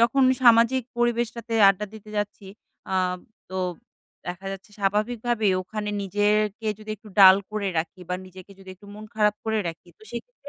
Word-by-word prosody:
যখন 240 +4 +4 0.2
সামাজিক 235 +2 +5 0.2
পরিবেশটাতে 235 -1 -1
আড্ডা 195 +2 +1
দিতে 215 -1 -12
যাচ্ছি, 205 -1 -3 0.5
আ - - +1 0.6
তো 185 - -3 0.7
দেখা 180 +2 -6
যাচ্ছে 195 +2 -10
স্বাভাবিক 210 +4 0
ভাবেই 220 -5 +2
ওখানে 210 +2 -5
নিজেরকে 210 +2 0
যদি 215 0 -9
একটু 215 +2 -16
ডাল 190 -1 +10
করে 210 -2 -2
রাখি 170 +3 -4
বা 180 - -1
নিজেকে 185 +1 -14
যদি 190 -1 -15
একটু 205 +2 -18
মন 210 +1 -9
খারাপ 210 -1 +3
করে 220 -1 0
রাখি, 165 +1 -9
তো - - -22
সেক্ষেত্রে 365 - -9
210 Hz, 165 wpm, -25 LUFS, 195-230 Hz, 0.7 s, ডাল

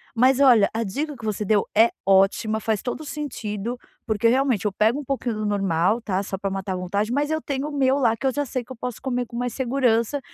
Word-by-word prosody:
mas 255 +3 +4
olha 240 -7 +6
a 225 +1 -1
dica 285 +9 -3
que 230 - -14
você 210 -1 -2
deu 205 0 +2
é 225 +2 +7 0.2
ótima 195 +3 +3
faz 220 -2 -1
todo 245 - -4
o - - -8
sentido 240 -6 -4 0.3
porque 220 0 +1
realmente 250 -4 +2
eu 210 - +1
pego 225 +8 +1
pouquinho 250 -4 -2
do 215 0 -3
normal 195 +1 +1
tá, 195 -4 -1
só 195 - -4
pra 195 +1 -3
matar 195 0 -3
a - - -2
vontade, 200 +5 -2
mas 290 +2 0
eu 315 - 0
tenho 280 0 -3
o - - -8
meu 265 0 +3
lá 230 -4 +2
que 270 - -6
eu 260 - +1
já 290 +2 -1
sei 255 -1 -3
que 260 - -9
posso 245 0 -5
comer 250 -2 -1
com 235 - -8
mais 245 -1 -2
segurança 250 0 +1
230 Hz, 245 wpm, -23 LUFS, 210-265 Hz, 0.3 s, é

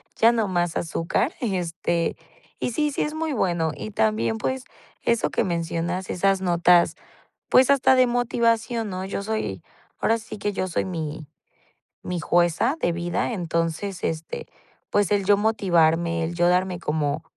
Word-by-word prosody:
ya 230 +1 +5
no 225 -3 0
más 175 -2 0
azúcar, 165 - -1
este, 175 -5 -1 0.4
y - - -1
sí, 300 +5 0
sí - - -2
es 300 - -3
muy 315 -1 -2
bueno. 175 -8 0
Y 105 +1 -6
también, 110 +1 +1
pues, 260 - -2 0.4
eso 235 -1 +1
que - - 0
mencionas, 170 +1 -2
esas 195 +1 +1
notas, 175 -1 +4 0.5
pues, 260 +2 +6
hasta 265 -1 +5
de 255 0 +5
motivación, 235 -1 0
¿no?, 185 0 -4
yo 200 +1 -4
soy, 200 - -3 0.4
ahora 225 - +2
sí 220 -1 -9
que 205 0 -2
yo 185 - -2
soy 175 - -1
mi 160 -4 -5 0.8
mi 180 -1 -3
jueza 175 - +2
de 175 - +2
vida. 175 +6 -1
Entonces, 170 +1 -2
este, 160 0 -4 0.4
pues, 205 -2 +2
el 200 -2 +2
yo 205 +1 +5
motivarme, 170 -6 +2
el 165 +2 -3
yo 175 0 +3
darme 180 0 +1
como 150 0 -1
180 Hz, 160 wpm, -24 LUFS, 165-220 Hz, 0.8 s, pues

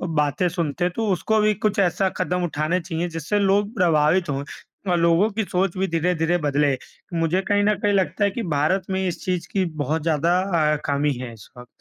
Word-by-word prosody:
बातें 150 +4 +1
सुनते 170 0 -1
तो 225 -1 -1
उसको 215 +4 +1
भी 210 0 +3
कुछ 210 +1 -1
ऐसा 190 0 +2
कदम 180 0 -1
उठाने 155 +1 0
चाहिए, 170 0 -3
जिससे 165 +5 -2
लोग 200 +2 +2
प्रभावित 170 -2 +2
हों 140 0 -2 0.5
और 175 - +3
लोगों 170 +5 +3
की 220 +2 -1
सोच 185 -1 -1
भी 190 +1 0
धीरे-धीरे 165 0 +1
बदले। 145 -3 +1 0.4
मुझे 165 +3 +1
कहीं 205 0 +3
न 210 +1 +3
कहीं 205 0 +2
लगता 195 +1 +1
है 200 - +2
कि 235 - -4
भारत 185 +7 +1
में 190 0 -1
इस 175 - -4
चीज़ 180 -2 -2
की 190 -2 +1 0.2
बहुत 155 +4 -1
ज़्यादा 165 +2 +2 0.3
अ, - - 0
कमी 145 0 +1
है 125 -2 -6
इस 110 -3 -15
वक़्त। 125 - -10
175 Hz, 205 wpm, -23 LUFS, 155-195 Hz, 0.5 s, भी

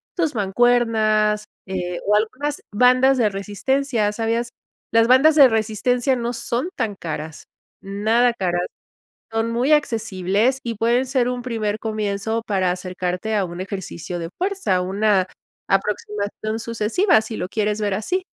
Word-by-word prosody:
tus 325 -5 0
mancuernas, 215 -1 +2 0.2
eh, 180 -2 -3
o 210 - +4
algunas 255 +7 -1
bandas 255 +4 +4
de 220 -3 +3
resistencia. 210 +3 -1
¿Sabías? 230 +2 -1 0.4
Las 230 0 +4
bandas 270 +5 +6
de 285 -3 +9
resistencia 230 +4 +1
no 240 0 -2
son 245 +6 -2
tan 225 -5 -2
caras, 155 -3 -6 0.4
nada 220 +5 +2
caras. 180 -5 -1 0.7
Son 225 +1 -1
muy 245 +5 +1
accesibles 225 -2 +1
y 235 - -3
pueden 235 +4 +2
ser 255 -2 +1
un 250 -1 -4
primer 215 -4 -2
comienzo 215 0 -2
para 190 -3 +1
acercarte 180 +3 -3
a 200 -2 +1
un 175 +1 -7
ejercicio 185 -3 -6
de 165 -1 -5
fuerza, 375 - 0
una 195 0 +1 0.4
aproximación 210 +2 -2
sucesiva 230 - +2
si 220 0 -6
lo 180 - -4
quieres 210 -1 -1
ver 205 -2 0
así. 360 - -1
220 Hz, 140 wpm, -21 LUFS, 200-245 Hz, 0.7 s, de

